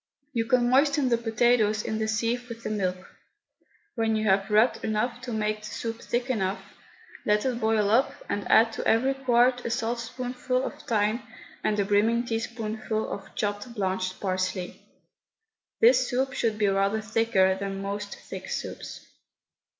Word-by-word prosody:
You 230 -2 0
can 240 +1 +3
moisten 280 +1 +3
the 235 - +3
potatoes 225 -2 +2
in 220 - -2
the 220 - 0
sieve 235 +3 -1
with 230 0 -8
the - - -3
milk. 185 -3 -2 0.9
When 225 -2 +1
you 215 0 0
have 195 +1 +2
rubbed 215 +4 +3
enough 230 +3 -1
to 250 -1 -6
make 215 -1 -1
the 215 - -11
soup 230 0 -5
thick 240 +1 -2
enough, 200 -5 -2 0.5
let 210 +2 +2
it 250 -2 0
boil 220 -2 +2
up 250 +5 +4 0.2
and 205 - -3
add 225 +1 +5
to - - -3
every 260 +5 +3
quart 250 -1 +2
a - - -2
saltspoonful 245 +2 -2
of 295 - -6
thyme 215 +1 +1 0.4
and 210 -1 +1
a 200 - +2
brimming 220 +4 +2
teaspoonful 225 -1 -3
of 195 - -7
chopped 205 +3 -3
blanched 185 -2 -2
parsley. 185 -1 -2 1.0
This 470 +2 +6
soup 265 +1 -1
should 225 -5 0
be 210 - +2
rather 195 +2 +2
thicker 215 -3 +2
than 195 0 -4
most 200 +1 -4
thick - - -9
soups. - - -6
225 Hz, 160 wpm, -27 LUFS, 205-240 Hz, 1.0 s, This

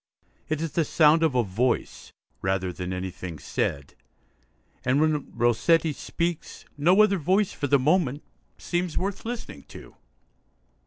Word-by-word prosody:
It 155 0 -1
is 165 -2 -3
the 165 - +1
sound 155 +1 +4
of 160 -5 +2
a 125 - +3
voice, 115 +6 -2 0.3
rather 95 -1 -1
than 90 +1 -5
anything 90 -2 -5
said; 70 -1 -3 0.9
and, 130 +3 +2
when 155 -2 0
Rossetti 135 +8 +2
speaks, 170 +3 -4
no 180 +8 +5
other 200 -3 +2
voice, 185 +6 +2
for 145 - -3
the 140 +1 +4
moment, 145 0 +1 0.3
seems 175 -1 -2
worth 195 +3 -3
listening 230 - -6
to. - - -13
150 Hz, 140 wpm, -26 LUFS, 115-170 Hz, 0.9 s, no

